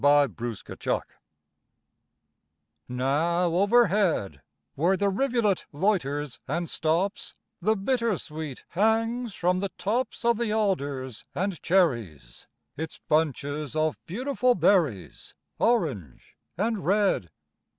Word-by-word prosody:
BY 145 0 +6
AN 120 -10 -4
AUTUMN 120 +2 -4
STREAM - - -3 1.9
Now 160 +8 +1
overhead, 195 - +2 0.3
Where 175 +6 +2
the 200 0 +2
rivulet 225 -2 +1
loiters 145 - -1
and 170 0 -2
stops, 170 +7 -1 0.2
The 215 +4 +2
bittersweet 195 - -2
hangs 225 +3 +1
from 180 +1 +1
the 200 +1 -2
tops 225 +7 -2
Of 235 -1 +3
the 235 -3 0
alders 140 - -1
and 190 -3 -2
cherries 115 - 0 0.3
Its 160 +2 -6
bunches 150 -1 0
of 155 -1 0
beautiful 250 +5 +1
berries, 155 - +1 0.2
Orange 145 - -1 0.2
and 215 +1 -1
red. 195 - +2
175 Hz, 105 wpm, -27 LUFS, 145-210 Hz, 1.9 s, BY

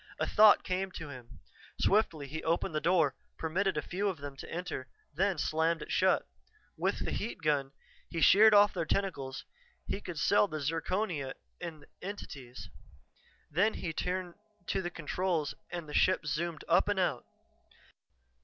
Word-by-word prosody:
A - - +1
thought 215 -1 +6
came 185 +1 -1
to 155 -3 -7
him; 125 -2 -12 0.4
swiftly 180 -8 +2
he 155 +3 -6
opened 165 0 0
the 155 - 0
door, 165 -6 +3 0.2
permitted 180 +2 0
a 150 - -1
few 195 +7 -2
of 185 - -4
them 140 -1 -7
to - - -9
enter, 170 -6 -4 0.3
then 190 +3 +1
slammed 160 +2 +1
it - - -9
shut. - - +3 0.5
With - - -1
the - - -2
heat 210 -5 -4
gun 140 -3 +1 0.4
he 165 - -3
sheared 210 +5 +7
off 205 0 +6
their 170 -4 -2
tentacles; 145 -9 -2 0.4
he 205 - -3
could 175 -5 -7
sell 205 +6 +4
the 155 -4 -4
zirconia 165 -1 -2 0.2
in 165 -3 -7
the - - -17
entities. 140 -10 -8 0.8
Then 200 +8 +2
he 165 -3 -4
turned 180 +1 -2 0.4
to - - +1
the 175 - -3
controls 170 -1 -1 0.2
and 170 -3 -5
the 150 - -8
ship 185 -1 +3
zoomed 160 +2 -2
up - - +4
and - - +1
out. - - 0
165 Hz, 165 wpm, -31 LUFS, 150-185 Hz, 0.8 s, sheared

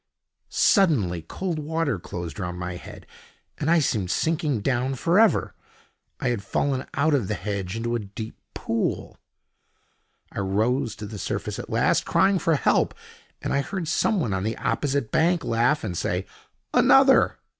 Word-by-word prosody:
Suddenly 120 - +3
cold 170 - -4
water 155 - -1
closed 85 +2 -6
round 90 -1 -4
my 90 0 -4
head, - - -11 0.5
and 150 - -1
I 170 - +5
seemed 110 - 0
sinking 155 - 0
down 130 +3 0
for 170 +9 +2
ever. 225 -2 +3 0.7
I - - 0
had 120 -4 -1
fallen 130 +6 -1
out 155 +2 +2
of 125 -9 +1
the - - -1
hedge 95 -1 -4
into 120 +1 -2
a 120 - 0
deep 110 +2 -7 0.2
pool. 115 0 -2 1.1
I - - -5
rose 110 +4 0
to 105 +3 -7
the 105 0 -7
surface - - -3
at - - -7
last, - - +2
crying 195 -1 +3
for 165 0 +2
help, 140 - +2 0.5
and - - -1
I 140 - +2
heard 185 +2 -4
someone 165 - +1
on 95 - -1
the 110 +3 -2
opposite 140 -5 -1
bank 170 0 +2
laugh 120 +6 +1
and 95 -5 -3
say: 90 +3 -1 0.5
"Another!" - - +5
120 Hz, 160 wpm, -25 LUFS, 100-155 Hz, 1.1 s, I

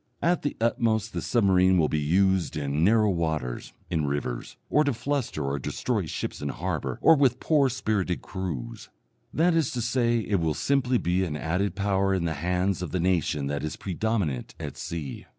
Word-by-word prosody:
At 175 0 +2
the 145 - -3
utmost 115 -1 +1
the - - -2
submarine 95 -5 +3
will 80 -3 +3
be 75 - 0
used 90 +2 +2
in 75 +1 -1
narrow 105 +1 +4
waters, 80 -8 -2 0.2
in 80 -4 -1
rivers, 70 -4 -3
or 150 - +3
to 145 -2 +1
fluster 135 - -2
or 70 +1 -1
destroy - - -2
ships - - -4
in 70 - -2
harbour 80 -6 -3
or 165 - +8
with 130 -4 +2
poor 145 -4 +3
spirited 100 -6 -1
crews 75 -11 -5 0.4
that 170 +2 +3
is 165 -4 +2
to 125 - -2
say, 120 0 +1
it 100 -3 0
will 80 -2 0
simply 130 -3 +1
be 90 -2 +1
an 75 -5 -3
added 90 +5 -1
power 100 -1 +1
in 90 -3 -1
the 80 - 0
hands 90 +4 0
of 90 - -3
the 90 - -2
nation 85 -5 +1
that 70 +1 -2
is 75 +1 -3
predominant 95 - -2
at - - -6
sea. 80 -4 -6
95 Hz, 185 wpm, -26 LUFS, 80-115 Hz, 0.4 s, or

